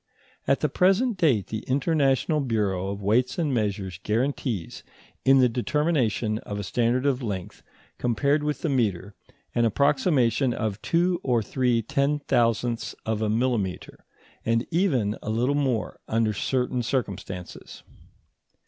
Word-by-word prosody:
At - - +2
the - - +2
present 200 +6 +2
date 140 - +2
the 110 - -4
International 140 +1 +1
Bureau 105 -8 -1
of 100 0 -5
Weights 115 +6 +2
and 155 -5 0
Measures 100 -6 -2
guarantees, 115 - -2 0.4
in 135 0 +6
the 125 - +6
determination 125 -4 0
of 100 - -6
a 105 - -3
standard 120 +6 0
of 135 -2 +1
length 100 -6 -5 0.4
compared 140 +5 +1
with 150 0 -2
the - - +1
metre, 105 -7 0 0.4
an 120 - +2
approximation 130 - +2
of 110 -2 -3
two 175 +1 +1
or 120 - +1
three 120 0 +1
ten 140 +4 +1
thousandths 120 -3 0
of 110 -1 -1
a 110 - 0
millimetre, 110 -5 -1 0.4
and 115 +1 +1
even 135 - +1
a - - -5
little 120 +5 +1
more 135 -6 -1
under 110 -1 +1
certain 125 +3 -1
circumstances. 100 -7 -5
120 Hz, 140 wpm, -25 LUFS, 110-140 Hz, 0.4 s, in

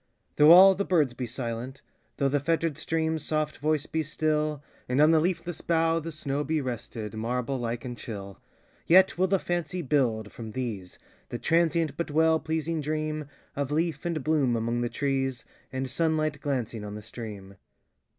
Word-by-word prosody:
Though 150 +2 +8
all 190 +3 +10
the 195 +2 -1
birds 155 -10 +2
be 125 0 -4
silent,—thoughThe 130 +3 -4
fettered 165 0 0
stream's 160 0 -1
soft 155 -1 -1
voice 155 0 0
be 160 - -1
still, 155 -1 -1 0.3
And 125 +2 +1
on 155 +2 +6
the 160 - +5
leafless 170 0 -2
bough 165 0 +2
the 165 +1 -6
snowBe 150 +1 -1
rested, 115 -3 -5
marble 125 +4 -2
like 120 0 -3
and 120 -1 -5
chill,—Yet 115 - 0
will 185 - +4
the 195 +1 +3
fancy 175 0 -3
build, 120 -7 0
from 110 -2 -8
these, 110 -8 -5 0.3
The - - -4
transient 165 -1 +1
but 170 - -2
well 160 +1 +3
pleasing 160 0 -2
dreamOf 150 -2 -4
leaf 155 -1 -1
and 165 -4 -2
bloom 145 -5 +2
among 115 +1 -1
the 120 - -1
trees, 135 -2 -1 0.3
And 130 +1 -3
sunlight 155 +1 0
glancing 120 -6 -2
on 105 0 -6
the 105 - -8
stream. 100 -4 -9
145 Hz, 160 wpm, -27 LUFS, 120-160 Hz, 0.3 s, all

